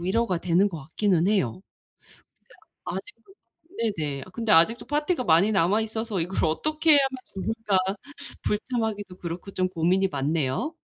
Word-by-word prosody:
위로가 190 0 0
되는 180 +4 +2
것 165 -5 -7
같기는 175 +4 +1
해요. 190 - +1 1.2
근데 - - -4
아직도 415 -1 -16 0.6
네네. 145 -3 -3
아 - - -14
근데 225 +1 -1
아직도 170 +9 +4
파티가 295 0 0
많이 175 +5 +4
남아 195 +4 +3
있어서 220 -2 -3
‘이걸 180 +3 -1
어떻게 310 - 0
해야만 270 -2 +4 0.2
좋을까.‘ 220 0 -1 0.7
불참하기도 210 -4 -2
그렇고 175 +3 -6
좀 185 -1 0
고민이 185 +3 +1
많네요. 145 - -1
195 Hz, 330 characters per minute, -26 LUFS, 170-230 Hz, 1.2 s, 아직도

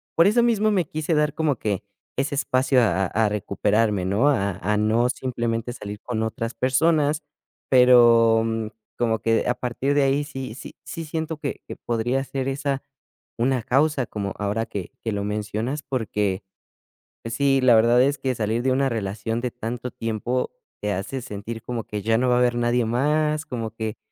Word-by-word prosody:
por 165 - +5
eso 240 +4 +4
mismo 215 -2 +3
me 185 -5 +2
quise 155 +2 -2
dar 150 -1 +2
como 150 -6 +1
que, 105 -4 -2 0.3
ese 140 +2 0
espacio 130 -2 +2
a 95 -3 +2
a 110 +1 +1
recuperarme, 105 0 0
¿no?, 105 +10 +3
a 100 -7 +1
a 105 +1 0
no 110 +3 +2
simplemente 120 -2 -2
salir 105 -3 -8
con 110 -3 -2
otras 115 +1 -3
personas, 150 +3 +2 0.5
pero 120 -3 +6 0.5
como 115 -2 +1
que 115 0 +1
a 125 - +3
partir 125 +3 -1
de 145 - +4
ahí 140 +2 +2
sí 135 -5 -6
sí - - -9
sí 165 -1 -6
siento 160 0 -3
que 145 -2 -5
que - - -6
podría 120 +3 -1
ser 135 -1 -3
esa, 140 0 -2 0.6
una 125 0 +1
causa, 135 +1 +2
como 100 -2 -4
ahora 105 +3 -1
que 95 -4 -6
que 115 - -1
lo 100 0 -2
mencionas 105 +7 -3
porque, 105 -6 -1 0.8
sí, 135 +4 +2
la 125 -2 +6
verdad 120 +2 +5
es 140 +2 +1
que, 130 -1 0
salir 110 +2 -1
de 130 - +2
una 135 +1 +2
relación 110 +1 -3
de 125 -1 -2
tanto 120 +2 -5
tiempo 115 +3 -2 0.3
te 105 0 -1
hace 100 +8 -4
sentir 110 +2 -6
como 120 -3 -4
que 105 -1 -4
ya 115 0 +2
no 125 +1 +2
va 125 - +4
a - - +3
haber 120 -1 +2
nadie 120 0 +1
más, 150 +5 +1
como 115 -4 -4
que, 110 -1 -4
120 Hz, 180 wpm, -24 LUFS, 110-135 Hz, 0.8 s, pero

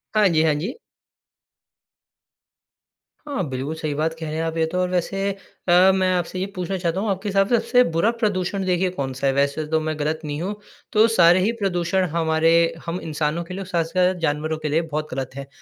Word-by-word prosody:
हाँ 210 -1 +5
जी, 160 -2 +3
हाँ 160 -1 +3
जी। 180 - -4 2.5
हाँ, 275 -9 -2
बिल्कुल 135 +4 -4
सही 155 -2 -3
बात 155 +3 -1
कह 160 - -5
रहे 155 - -4
हैं 160 - -1
आप 165 0 -3
ये 160 - +2
तो 180 - -2
और 180 - 0
वैसे 195 +2 -1
अ, 190 -1 +2
मैं 185 -1 +2
आपसे 180 +1 -2
ये 185 - 0
पूछना 185 +1 -2
चाहता 175 0 -1
हूँ, 210 +2 -1
आपके 195 +1 -2
हिसाब 195 0 +2
से 240 - +3
सबसे 250 +3 +4
बुरा 190 +8 +3
प्रदूषण 195 -2 0
देखिए 185 0 +1
कौन-सा 135 -5 -3
है? 135 - +2
वैसे 140 +3 0
तो 160 +1 +1
मैं 155 0 -3
गलत 155 +2 -1
नहीं 150 +1 -4
हूँ, 200 +4 -3 0.4
तो 220 +1 +6
सारे 180 -5 +5
ही 200 +5 +2
प्रदूषण 185 -1 0
हमारे 160 0 +2 0.3
हम 170 +2 -3
इंसानों 155 +1 -2
के 170 - -9
लिए 195 +1 -4
साथ-साथ 180 +1 +1
जानवरों 155 0 -1
के 155 -1 -4
लिए 155 +3 +2
बहुत 155 -2 -4
गलत 130 0 -4
हैं, 140 0 -7
170 Hz, 210 wpm, -22 LUFS, 155-190 Hz, 2.5 s, तो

